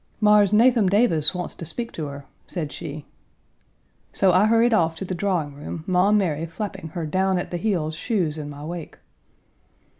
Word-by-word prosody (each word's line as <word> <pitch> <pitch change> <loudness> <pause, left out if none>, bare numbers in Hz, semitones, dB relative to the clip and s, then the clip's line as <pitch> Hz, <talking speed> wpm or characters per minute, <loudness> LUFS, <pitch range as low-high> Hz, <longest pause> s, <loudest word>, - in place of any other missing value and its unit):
"Mars 210 -2 +5
Nathum 225 -2 +4
Davis 185 -7 +3
wants 180 -1 -4
to - - -9
speak 235 +8 -5
to 155 -3 -5
her," 140 0 -8 0.2
said 155 -6 -4
she. 150 -1 -7 1.1
So 190 -2 +3
I 190 +4 +5
hurried 230 +1 +4
off 165 -6 +2
to 190 - -6
the 185 - -4
drawing 175 -5 -1
room, 150 +3 -7
Maum 190 +3 +3
Mary 165 -5 -1
flapping 195 +1 -6
her 170 -2 -2
down 190 +4 +1
at 175 - -4
the 175 - -2
heels 170 -5 -1
shoes 165 -5 -1
in 145 -1 -6
my 145 0 -8
wake. 170 -1 -7
180 Hz, 180 wpm, -23 LUFS, 155-205 Hz, 1.1 s, Mars